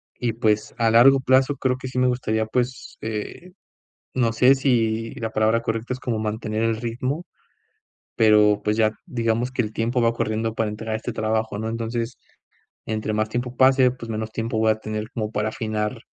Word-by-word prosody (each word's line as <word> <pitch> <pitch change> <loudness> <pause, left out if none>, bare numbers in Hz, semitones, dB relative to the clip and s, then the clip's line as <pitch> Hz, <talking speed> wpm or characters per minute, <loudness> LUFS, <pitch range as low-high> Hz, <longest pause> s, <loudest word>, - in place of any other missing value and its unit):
Y, 120 -3 -2
pues, 110 -2 0
a 115 -1 +2
largo 135 +4 +7
plazo 130 +2 +3
creo 130 -1 0
que 130 - -7
sí 130 - -6
me 130 - +3
gustaría, 110 -3 0
pues, 125 +3 -3
eh, 110 +11 -6 0.6
no 115 -3 +1
sé 125 +4 +6
si, 115 -4 0
la 110 -1 -4
palabra 110 +2 +2
correcta 115 +2 -2
es - - -12
como 115 -4 -2
mantener 110 0 -2
el 115 0 +1
ritmo, 130 +8 -3 0.9
pero, 105 -2 +5
pues, 105 +1 0
ya, 110 -1 +3
digamos 115 +1 -1
que 125 - 0
el 110 0 -6
tiempo 120 +2 0
va 115 0 +3
corriendo 110 0 -2
para 110 -1 0
entregar 110 +1 -4
este 115 +2 -4
trabajo, 110 -1 -1
¿no? 110 - -3
Entonces, 115 +1 -3 0.7
entre 110 0 -2
más 110 0 0
tiempo 120 +2 -3
pase 130 -1 +5
pues 120 -2 -9
menos 110 0 -3
tiempo 115 0 -3
voy 110 0 +3
a - - +1
tener 110 +1 -4
como 110 -3 -2
para 110 0 -1
afinar, 110 +1 -3
115 Hz, 190 wpm, -23 LUFS, 110-125 Hz, 0.9 s, largo